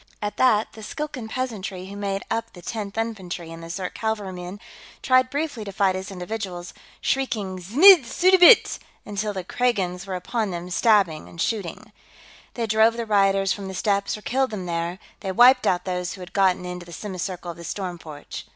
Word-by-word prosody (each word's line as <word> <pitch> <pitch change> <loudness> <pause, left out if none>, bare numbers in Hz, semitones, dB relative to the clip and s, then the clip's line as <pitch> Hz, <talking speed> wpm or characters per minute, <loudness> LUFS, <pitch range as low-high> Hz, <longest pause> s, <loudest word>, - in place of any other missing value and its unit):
At 210 -1 -4
that, 225 -4 +3
the 220 - -11
Skilkan 265 0 -5
peasantry 210 -7 -4
who 195 +1 -9
made 200 -1 -3
up 230 0 -2
the 175 - -12
Tenth 210 0 -5
Infantry 190 -7 -4
and 165 0 -9
the 165 - -9
Zirk 180 +1 -4
cavalrymen 200 -4 -4 0.4
tried 255 -1 +4
briefly 285 -5 -3
to 200 - -6
fight 195 -1 +2
as 190 +1 -5
individuals, 185 -2 -6 0.3
shrieking 210 -8 -1
"Znidd 285 - +7
suddabit!" 370 - +6 0.3
until 210 0 -2
the 190 -2 -5
Kragans 195 -4 -1
were 190 - -3
upon 215 +4 -2
them, 175 0 -6
stabbing 190 -6 +2
and 170 - -13
shooting. 195 -3 -3 0.6
They 235 - -1
drove 220 +1 +3
the 235 - -2
rioters 195 -2 +3
from 200 -2 -7
the 190 - -6
steps 200 +1 0
or 210 - -14
killed 265 +2 +1
them 200 -4 -5
there, 170 +1 -2 0.2
they 195 - -3
wiped 250 +6 +6
out 180 0 +1
those 180 -1 -2
who 190 - -10
had 180 - -10
gotten 190 -2 +2
into 180 -1 -7
the 170 - -10
semicircle 185 -3 -5
of 170 - -12
the 170 - -10
storm 180 -1 -5
porch. 150 -3 -9
200 Hz, 190 wpm, -24 LUFS, 180-225 Hz, 0.6 s, Znidd